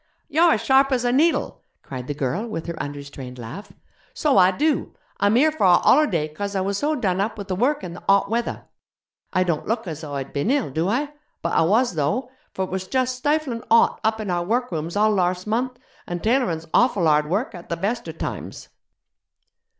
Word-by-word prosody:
'You're 330 Hz, +2 st, +4 dB
as -, -, -1 dB
sharp 270 Hz, +1 st, +4 dB
as 250 Hz, -2 st, +1 dB
a 245 Hz, -, +2 dB
needle,' 315 Hz, +6 st, +1 dB, 0.2 s
cried 130 Hz, -2 st, -7 dB
the 145 Hz, -, -3 dB
girl 145 Hz, -, -2 dB
with 190 Hz, -8 st, -5 dB
her 170 Hz, -1 st, -5 dB
unrestrained 140 Hz, -3 st, -7 dB
laugh; 130 Hz, -, -8 dB, 0.4 s
'so 300 Hz, -, +2 dB
I 185 Hz, -2 st, +7 dB
do. 295 Hz, +11 st, 0 dB, 0.2 s
I'm 205 Hz, +2 st, +3 dB
here 305 Hz, +6 st, +5 dB
for 305 Hz, -10 st, 0 dB
a 175 Hz, -1 st, +7 dB
hollerday 195 Hz, -, +3 dB
'cos 200 Hz, +5 st, -4 dB
I 190 Hz, -, +1 dB
was 195 Hz, +1 st, -1 dB
so 305 Hz, +2 st, 0 dB
done 195 Hz, -8 st, 0 dB
up 215 Hz, +2 st, -2 dB
with 200 Hz, -1 st, -7 dB
the 185 Hz, -, 0 dB
work 280 Hz, +9 st, +1 dB
and 175 Hz, -1 st, -6 dB
the -, -, -11 dB
hot 200 Hz, 0 st, +4 dB
weather. 235 Hz, +3 st, -2 dB, 0.7 s
I 185 Hz, -1 st, +2 dB
don't 170 Hz, -4 st, -2 dB
look 225 Hz, +1 st, -1 dB
as 160 Hz, -3 st, -6 dB
though 145 Hz, -3 st, -6 dB
I'd 135 Hz, -1 st, -5 dB
bin 145 Hz, +9 st, -1 dB
ill, 270 Hz, -, +1 dB
do 160 Hz, +6 st, 0 dB
I? 285 Hz, +7 st, -1 dB, 0.3 s
But 170 Hz, -, -1 dB
I -, -, +4 dB
was, 215 Hz, +8 st, +3 dB
though: 165 Hz, -, -1 dB, 0.2 s
for 190 Hz, -, -2 dB
it 185 Hz, -, -12 dB
was 190 Hz, 0 st, -3 dB
just 255 Hz, +3 st, 0 dB
stiflin' 280 Hz, -3 st, -1 dB
hot 230 Hz, 0 st, +4 dB
up 220 Hz, 0 st, +1 dB
in 210 Hz, -4 st, -3 dB
our 175 Hz, 0 st, 0 dB
workrooms 175 Hz, -6 st, -2 dB
all 215 Hz, +1 st, +3 dB
larse 180 Hz, -1 st, 0 dB
month, 245 Hz, +4 st, -1 dB, 0.3 s
an' 175 Hz, -1 st, -4 dB
tailorin's 220 Hz, -9 st, +1 dB
awful 220 Hz, -8 st, +3 dB
hard 150 Hz, -1 st, +3 dB
work 210 Hz, +9 st, -1 dB
at 175 Hz, -2 st, -11 dB
the 170 Hz, -, -2 dB
bester 200 Hz, -1 st, -2 dB
times.' 160 Hz, -, -6 dB
200 Hz, 210 wpm, -23 LUFS, 170-250 Hz, 0.7 s, I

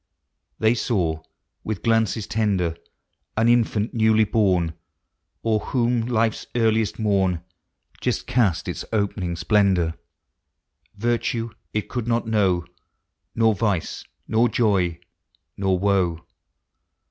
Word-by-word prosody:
They 110 Hz, +1 st, +3 dB
saw, 90 Hz, -10 st, -1 dB, 0.4 s
with 110 Hz, -4 st, -4 dB
glanees 115 Hz, -2 st, +1 dB
tender, 95 Hz, -7 st, 0 dB, 0.6 s
An 110 Hz, +1 st, +3 dB
infant 115 Hz, -2 st, +2 dB
newly 110 Hz, -1 st, +4 dB
born. 95 Hz, -6 st, +1 dB, 0.7 s
O'er 110 Hz, -1 st, +2 dB
whom 120 Hz, -1 st, 0 dB
life's 115 Hz, -2 st, 0 dB
earliest 110 Hz, -2 st, +2 dB
morn 95 Hz, -5 st, +1 dB, 0.6 s
Just -, -, -1 dB
east 105 Hz, -9 st, +2 dB
its -, -, -4 dB
opening 100 Hz, -5 st, -1 dB
splendor; 90 Hz, -2 st, +2 dB, 1.0 s
Virtue 115 Hz, +1 st, -1 dB, 0.2 s
it 105 Hz, -, -2 dB
could 120 Hz, -3 st, -4 dB
not 115 Hz, 0 st, +1 dB
know. 95 Hz, -6 st, +2 dB, 0.7 s
Nor 115 Hz, -1 st, +4 dB
vice, 100 Hz, -4 st, -1 dB, 0.2 s
nor 115 Hz, +2 st, +3 dB
joy, 95 Hz, -7 st, +1 dB, 0.6 s
nor 95 Hz, -1 st, +1 dB
woe. 90 Hz, -4 st, +1 dB
105 Hz, 105 wpm, -23 LUFS, 95-115 Hz, 1.0 s, newly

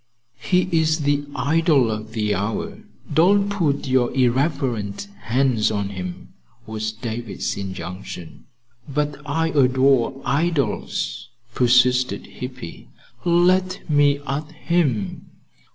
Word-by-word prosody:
"He's 165 Hz, -3 st, +2 dB
the 145 Hz, 0 st, +1 dB
idol 145 Hz, -5 st, +3 dB
of 110 Hz, +1 st, -5 dB
the 105 Hz, -2 st, 0 dB
hour. 105 Hz, +3 st, -3 dB, 0.3 s
Don't 200 Hz, +5 st, +4 dB
put 165 Hz, -9 st, 0 dB
your 130 Hz, -2 st, +2 dB
irreverent 130 Hz, -, 0 dB, 0.2 s
hands 125 Hz, -2 st, +2 dB
on 100 Hz, -2 st, -2 dB
him," 90 Hz, -2 st, -7 dB, 0.4 s
was 110 Hz, 0 st, -3 dB
David's 115 Hz, 0 st, -4 dB
injunction. 90 Hz, -2 st, -7 dB, 0.4 s
"But 145 Hz, +1 st, -2 dB
I 160 Hz, +3 st, 0 dB
adore 130 Hz, -2 st, +3 dB
idols," 140 Hz, -5 st, -1 dB, 0.2 s
persisted 125 Hz, +1 st, +3 dB
Hippy. 125 Hz, -9 st, -8 dB, 0.4 s
"Let 180 Hz, +2 st, +2 dB
me 145 Hz, -2 st, +4 dB
at 150 Hz, +3 st, -3 dB
him." 150 Hz, -, -1 dB
130 Hz, 100 wpm, -22 LUFS, 110-155 Hz, 0.4 s, Don't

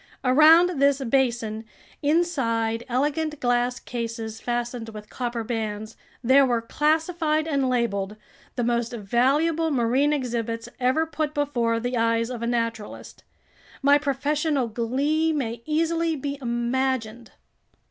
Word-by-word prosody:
Around 310 Hz, +5 st, +6 dB
this 280 Hz, -1 st, +4 dB
basin, 235 Hz, -4 st, 0 dB, 0.4 s
inside 260 Hz, -8 st, 0 dB
elegant 295 Hz, +4 st, -1 dB
glass 245 Hz, 0 st, +1 dB
cases 230 Hz, -2 st, -5 dB
fastened 240 Hz, -1 st, -3 dB
with 210 Hz, -1 st, -10 dB
copper 240 Hz, -2 st, -3 dB
bands, 220 Hz, -1 st, -4 dB, 0.3 s
there 265 Hz, +3 st, +6 dB
were 245 Hz, -3 st, +2 dB
classified 315 Hz, +3 st, 0 dB
and 275 Hz, -4 st, +1 dB
labeled 210 Hz, -5 st, -1 dB, 0.4 s
the 245 Hz, -, -1 dB
most 235 Hz, 0 st, 0 dB
valuable 275 Hz, +10 st, +1 dB
marine 265 Hz, +2 st, +2 dB
exhibits 235 Hz, -4 st, -2 dB
ever 260 Hz, +6 st, +2 dB
put 310 Hz, -1 st, -3 dB
before 240 Hz, -6 st, 0 dB
the 245 Hz, +1 st, -2 dB
eyes 230 Hz, +1 st, +1 dB
of 240 Hz, -2 st, -5 dB
a 235 Hz, -, -2 dB
naturalist. 230 Hz, -3 st, -4 dB, 0.6 s
My 285 Hz, +1 st, +6 dB
professorial 285 Hz, -1 st, 0 dB
glee 280 Hz, +8 st, 0 dB
may 235 Hz, -6 st, -3 dB
easily 330 Hz, +1 st, +1 dB
be 280 Hz, 0 st, -4 dB
imagined. 240 Hz, -1 st, -2 dB
250 Hz, 120 wpm, -24 LUFS, 230-295 Hz, 0.6 s, Around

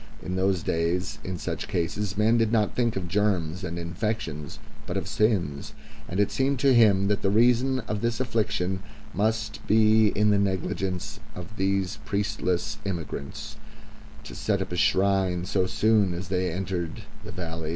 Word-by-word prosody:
In 90 Hz, -, -3 dB
those 95 Hz, -2 st, +1 dB
days, 85 Hz, +3 st, -1 dB
in 95 Hz, -1 st, -4 dB
such -, -, -4 dB
cases, 100 Hz, +4 st, -2 dB
men 110 Hz, +2 st, +4 dB
did 115 Hz, -1 st, +2 dB
not 110 Hz, -3 st, +2 dB
think 120 Hz, -2 st, +1 dB
of 95 Hz, -2 st, -3 dB
germs 95 Hz, -3 st, 0 dB
and 85 Hz, -1 st, -4 dB
infections 85 Hz, -3 st, -3 dB, 0.3 s
but -, -, -2 dB
of -, -, -3 dB
sins; 95 Hz, -10 st, 0 dB, 0.4 s
and 90 Hz, -, -2 dB
it 105 Hz, -, +2 dB
seemed 135 Hz, +1 st, +1 dB
to 135 Hz, -2 st, +5 dB
him 100 Hz, -5 st, +5 dB
that 105 Hz, 0 st, +1 dB
the 95 Hz, -, +2 dB
reason 125 Hz, +4 st, +3 dB
of 105 Hz, -2 st, -4 dB
this 115 Hz, -1 st, -1 dB
affliction 105 Hz, -6 st, -1 dB, 0.3 s
must 110 Hz, +1 st, -1 dB
lie 110 Hz, -1 st, +5 dB
in 105 Hz, +1 st, +3 dB
the 100 Hz, -, +3 dB
negligence 95 Hz, -1 st, -2 dB, 0.2 s
of 90 Hz, +5 st, -9 dB
these 95 Hz, +1 st, 0 dB
priestless 100 Hz, 0 st, -1 dB
immigrants 85 Hz, -7 st, -5 dB, 0.7 s
to -, -, -9 dB
set 100 Hz, -2 st, 0 dB
up 95 Hz, -1 st, -4 dB
a -, -, -2 dB
shrine 95 Hz, -1 st, +2 dB
so 95 Hz, -1 st, +1 dB
soon 105 Hz, -3 st, +2 dB
as 90 Hz, +2 st, -6 dB
they 90 Hz, -2 st, 0 dB
entered 90 Hz, +1 st, -3 dB, 0.2 s
the 105 Hz, -, -8 dB
valley. 80 Hz, -4 st, -5 dB
100 Hz, 165 wpm, -26 LUFS, 90-110 Hz, 0.7 s, to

